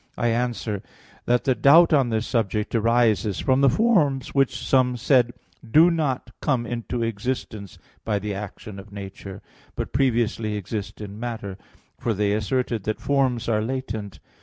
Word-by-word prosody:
I 120 Hz, -, +1 dB
answer 115 Hz, -3 st, -1 dB, 0.4 s
that, 120 Hz, 0 st, +2 dB
The 130 Hz, -, +3 dB
doubt 160 Hz, +6 st, +6 dB
on 135 Hz, -5 st, +3 dB
this 110 Hz, 0 st, -1 dB
subject 105 Hz, -3 st, -1 dB
arises 115 Hz, -3 st, +2 dB
from 130 Hz, 0 st, +2 dB
the 140 Hz, -, +6 dB
forms 150 Hz, -, +2 dB
which, 135 Hz, -2 st, +2 dB
some 125 Hz, -2 st, +2 dB
said, 125 Hz, 0 st, +3 dB, 0.3 s
do 155 Hz, +9 st, +5 dB
not 150 Hz, -6 st, -1 dB
come 130 Hz, -5 st, 0 dB
into 120 Hz, 0 st, -3 dB
existence 110 Hz, -3 st, -4 dB, 0.3 s
by 105 Hz, -2 st, 0 dB
the 105 Hz, +1 st, -4 dB
action 100 Hz, 0 st, -7 dB
of 100 Hz, +1 st, -13 dB
nature, 100 Hz, -1 st, -9 dB, 0.3 s
but -, -, -5 dB
previously 115 Hz, -4 st, +1 dB
exist 105 Hz, +1 st, -5 dB
in 105 Hz, 0 st, -8 dB
matter; 110 Hz, -5 st, -5 dB, 0.4 s
for 115 Hz, -, -1 dB
they 100 Hz, 0 st, +1 dB
asserted 110 Hz, +1 st, -1 dB
that 110 Hz, -, -2 dB
forms 135 Hz, -4 st, 0 dB
are 110 Hz, -2 st, +1 dB
latent. 110 Hz, -4 st, -4 dB
115 Hz, 155 wpm, -24 LUFS, 105-130 Hz, 0.4 s, doubt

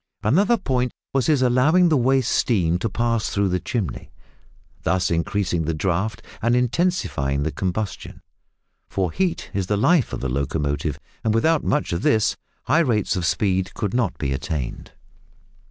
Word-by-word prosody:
Another 195 Hz, -, +3 dB
point 125 Hz, -, -1 dB, 0.2 s
was 135 Hz, -2 st, +1 dB
his 145 Hz, -5 st, +3 dB
allowing 150 Hz, +9 st, +4 dB
the 155 Hz, -, +3 dB
waste 130 Hz, -1 st, +2 dB
steam 90 Hz, -7 st, +2 dB
to 115 Hz, -, -1 dB
pass 115 Hz, +1 st, 0 dB
through 100 Hz, -1 st, +1 dB
the 90 Hz, 0 st, 0 dB
chimney, 95 Hz, -, -4 dB, 0.7 s
thus 90 Hz, 0 st, +1 dB
increasing 85 Hz, 0 st, 0 dB
the 80 Hz, +1 st, -1 dB
draught 95 Hz, +6 st, -1 dB, 0.2 s
and 120 Hz, +2 st, +2 dB
intensifying 125 Hz, -, 0 dB
the 80 Hz, -, -1 dB
combustion; 95 Hz, +3 st, -4 dB, 0.7 s
for 95 Hz, -3 st, -1 dB
heat 180 Hz, -, -2 dB
is 95 Hz, -2 st, -1 dB
the 105 Hz, -, +1 dB
life 145 Hz, -, +3 dB
of -, -, -4 dB
the 65 Hz, -, -2 dB
locomotive, 70 Hz, +2 st, -1 dB, 0.3 s
and 110 Hz, -1 st, +1 dB
without 160 Hz, +7 st, +2 dB
much 150 Hz, -11 st, 0 dB
of 85 Hz, -, -2 dB
this, 110 Hz, -1 st, +2 dB, 0.3 s
high 155 Hz, -, +3 dB
rates 120 Hz, -, +1 dB
of 90 Hz, -3 st, -1 dB
speed 95 Hz, -1 st, 0 dB
could 100 Hz, -2 st, -2 dB
not 125 Hz, -1 st, 0 dB
be 70 Hz, -2 st, -1 dB
attained. 75 Hz, -3 st, -4 dB
105 Hz, 160 wpm, -22 LUFS, 85-125 Hz, 0.7 s, allowing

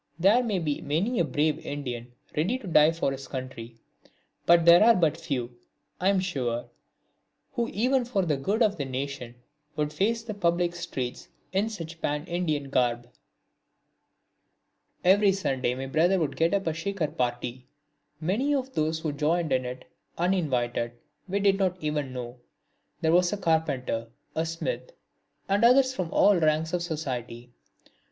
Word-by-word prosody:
There 200 Hz, +8 st, +5 dB
may 215 Hz, -5 st, 0 dB
be 150 Hz, -5 st, -2 dB
many 185 Hz, -, 0 dB
a -, -, +4 dB
brave 150 Hz, +1 st, 0 dB
Indian 125 Hz, -4 st, -5 dB, 0.2 s
ready 185 Hz, +12 st, +1 dB
to 255 Hz, -, -12 dB
die 160 Hz, -3 st, +5 dB
for 165 Hz, -4 st, -1 dB
his 135 Hz, 0 st, -6 dB
country, 130 Hz, -3 st, -7 dB, 0.7 s
but 170 Hz, -1 st, +6 dB
there 170 Hz, +3 st, +8 dB
are 230 Hz, +1 st, +7 dB
but 160 Hz, -5 st, +2 dB
few, 135 Hz, -7 st, -4 dB, 0.4 s
I 185 Hz, -, +3 dB
am 200 Hz, -1 st, +3 dB
sure, 125 Hz, -10 st, -2 dB, 0.8 s
who 240 Hz, -3 st, -1 dB
even 250 Hz, +4 st, +1 dB
for 205 Hz, -6 st, 0 dB
the 155 Hz, -3 st, +1 dB
good 200 Hz, -, +1 dB
of 205 Hz, -3 st, +1 dB
the 140 Hz, -, -2 dB
nation 130 Hz, -2 st, -5 dB, 0.4 s
would 150 Hz, 0 st, -1 dB
face 225 Hz, +7 st, 0 dB
the 225 Hz, -2 st, -5 dB
public 175 Hz, -3 st, +1 dB
streets 135 Hz, -8 st, -5 dB, 0.3 s
in 200 Hz, +4 st, +1 dB
such 165 Hz, -6 st, -8 dB
pan 150 Hz, +2 st, -1 dB
Indian 155 Hz, -6 st, -2 dB
garb. 120 Hz, -1 st, 0 dB, 1.9 s
Every 195 Hz, +2 st, +5 dB
Sunday 135 Hz, -10 st, -1 dB
my 135 Hz, +1 st, -4 dB
brother 165 Hz, +8 st, +3 dB
would 150 Hz, -6 st, -1 dB
get 165 Hz, +4 st, +2 dB
up 195 Hz, -, -1 dB
a 160 Hz, -, 0 dB
Shikar 165 Hz, 0 st, -2 dB
party. 125 Hz, -2 st, -3 dB, 0.5 s
Many 220 Hz, -, +1 dB
of 265 Hz, -1 st, -3 dB
those 160 Hz, -2 st, 0 dB
who 155 Hz, -, -1 dB
joined 155 Hz, +2 st, 0 dB
in 130 Hz, -1 st, +1 dB
it, 125 Hz, +1 st, -6 dB, 0.3 s
uninvited, 130 Hz, -10 st, 0 dB, 0.4 s
we 200 Hz, +2 st, 0 dB
did 195 Hz, -1 st, +3 dB
not 185 Hz, -2 st, +1 dB
even 150 Hz, -4 st, -2 dB
know. 125 Hz, -1 st, -7 dB, 0.6 s
There 160 Hz, -, +2 dB
was 175 Hz, 0 st, +4 dB
a 205 Hz, -, -1 dB
carpenter, 155 Hz, -, 0 dB, 0.3 s
a 160 Hz, +1 st, 0 dB
smith 335 Hz, -, -4 dB, 0.5 s
and 200 Hz, +3 st, +2 dB
others 260 Hz, +2 st, +5 dB
from 185 Hz, -9 st, -3 dB
all 200 Hz, -3 st, +5 dB
ranks 155 Hz, +1 st, +1 dB
of 180 Hz, -, 0 dB
society. 125 Hz, -7 st, -5 dB
160 Hz, 160 wpm, -27 LUFS, 135-195 Hz, 1.9 s, there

